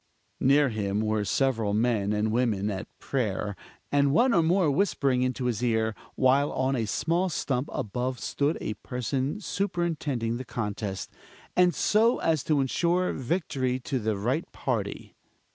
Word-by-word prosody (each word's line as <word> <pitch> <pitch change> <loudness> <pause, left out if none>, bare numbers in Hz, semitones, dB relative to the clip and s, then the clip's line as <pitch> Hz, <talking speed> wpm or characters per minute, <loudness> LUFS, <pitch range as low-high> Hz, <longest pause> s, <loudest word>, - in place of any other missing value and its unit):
Near 140 +1 +4
him 105 -2 -1
were 110 -1 0
several 110 -2 +1
men 110 -3 +1
and 105 +1 0
women 110 -4 +1
at 95 -1 -5
prayer, 105 -6 -2 0.4
and 140 -1 +3
one 240 - +4
or 170 - +5
more 165 -1 +3
whispering 140 -6 +1
into 130 0 -1
his 120 -4 -1
ear; 110 -2 +1 0.2
while 135 +2 +3
on 130 +1 +1
a 115 -4 -1
small 170 - 0
stump 135 -4 -1
above 125 +4 -2
stood 145 +3 0
a 105 - -3
person 130 - -3
superintending 160 - -1
the 130 - -5
contest, 105 -5 -4 0.4
and 180 -1 +4
so 225 +3 +3
as 160 -5 +1
to 150 -3 +2
insure 175 +7 +1
victory 130 -3 -1
to 130 0 -2
the 110 -2 -1
right 125 +11 -1
party. 110 -6 -3
130 Hz, 150 wpm, -27 LUFS, 110-150 Hz, 0.4 s, or